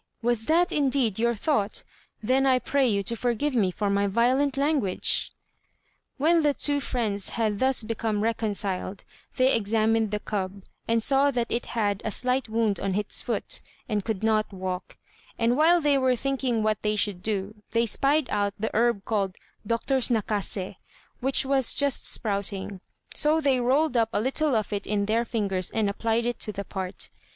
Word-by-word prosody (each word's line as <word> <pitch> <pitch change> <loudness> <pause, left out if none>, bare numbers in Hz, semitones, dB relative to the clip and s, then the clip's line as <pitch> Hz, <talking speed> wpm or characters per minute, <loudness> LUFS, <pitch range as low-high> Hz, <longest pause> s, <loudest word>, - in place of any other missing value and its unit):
was 235 -2 0
that 345 +3 +3
indeed 265 -7 +1
your 235 +1 +1
thought? 210 -3 -1 0.4
Then 265 +4 +2
I 260 -1 +5
pray 275 +1 +1
you 200 -3 +1
to 235 +5 -3
forgive 245 +5 -1
me 210 -7 +2
for 205 +3 -3
my 200 0 +1
violent 255 +7 +1
language." 280 -10 0 0.9
When 325 +4 +3
the 295 -2 +2
two 285 -1 0
friends 220 -7 -2
had 215 -3 0
thus 260 -2 +2
become 220 -1 -2
reconciled, 205 -4 -2 0.3
they 260 +1 +3
examined 220 0 +1
the 210 0 -2
cub, 195 -2 -4 0.2
and 230 -1 +2
saw 275 +2 +4
that 245 -4 -2
it 235 - -2
had 205 -3 0
a - - -2
slight 250 +3 0
wound 220 -2 0
in 195 -1 -2
its 210 0 0
foot, - - -2 0.3
and 210 -3 -1
could 220 -2 -3
not 215 -1 +1
walk; 185 -1 -5 0.4
and 235 +1 +2
while 330 +4 +5
they 290 -3 +2
were 260 -1 +2
thinking 255 -3 -1
what 215 -1 0
they 210 0 0
should 200 -3 0
do, 210 0 -3
they 230 0 +1
spied 275 +5 +2
out 205 -1 0
the 220 - -2
herb 230 -3 +1
called 195 -4 -1 0.3
"Doctor's 250 +3 +1
Nakasé," 205 -4 -2 0.4
which 270 +1 +2
was 265 -2 +3
just 280 -2 +3
sprouting; 200 -2 -1 0.3
so 305 +2 +2
they 275 -4 +2
rolled 265 +4 +1
up 225 -2 +2
a - - +1
little 270 +4 +1
of 215 -1 -1
it 200 0 -3
in 205 -1 0
their 225 +3 +1
fingers 195 -6 -1
and 220 -2 0
applied 225 +3 -1
it 240 -1 -2
to 215 - -3
the 200 -1 -6
part. 190 -1 -5
225 Hz, 180 wpm, -26 LUFS, 205-260 Hz, 0.9 s, I